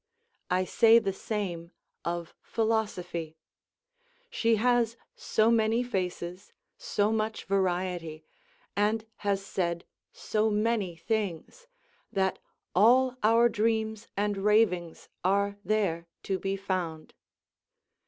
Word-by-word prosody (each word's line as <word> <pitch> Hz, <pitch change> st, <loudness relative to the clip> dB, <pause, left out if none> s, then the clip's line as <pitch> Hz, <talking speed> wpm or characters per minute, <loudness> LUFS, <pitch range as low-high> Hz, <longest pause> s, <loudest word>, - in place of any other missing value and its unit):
I 185 Hz, +1 st, +2 dB
say 225 Hz, +4 st, +6 dB
the 195 Hz, -4 st, +1 dB
same 185 Hz, -5 st, -4 dB, 0.3 s
of 170 Hz, 0 st, -3 dB
Philosophy; 180 Hz, -8 st, -2 dB, 0.9 s
she 230 Hz, -, +2 dB
has 235 Hz, 0 st, +2 dB, 0.2 s
so 220 Hz, +1 st, +2 dB
many 225 Hz, +1 st, +3 dB
faces, 185 Hz, -4 st, -4 dB, 0.2 s
so 205 Hz, +1 st, 0 dB
much 220 Hz, 0 st, -2 dB
variety, 180 Hz, -4 st, -1 dB, 0.5 s
and 215 Hz, +2 st, +1 dB
has 200 Hz, -1 st, -1 dB
said 170 Hz, -3 st, -2 dB, 0.3 s
so 215 Hz, 0 st, 0 dB
many 210 Hz, -4 st, 0 dB
things, 215 Hz, -, -3 dB, 0.4 s
that 190 Hz, -1 st, 0 dB, 0.3 s
all 250 Hz, +6 st, +5 dB
our 230 Hz, +2 st, +5 dB
dreams 220 Hz, -1 st, -1 dB
and 205 Hz, 0 st, 0 dB
ravings 195 Hz, -5 st, +2 dB, 0.2 s
are 200 Hz, +2 st, +1 dB
there 190 Hz, -7 st, 0 dB, 0.2 s
to 190 Hz, -1 st, -1 dB
be 195 Hz, 0 st, -1 dB
found. 180 Hz, -5 st, -3 dB
205 Hz, 105 wpm, -29 LUFS, 180-220 Hz, 0.9 s, say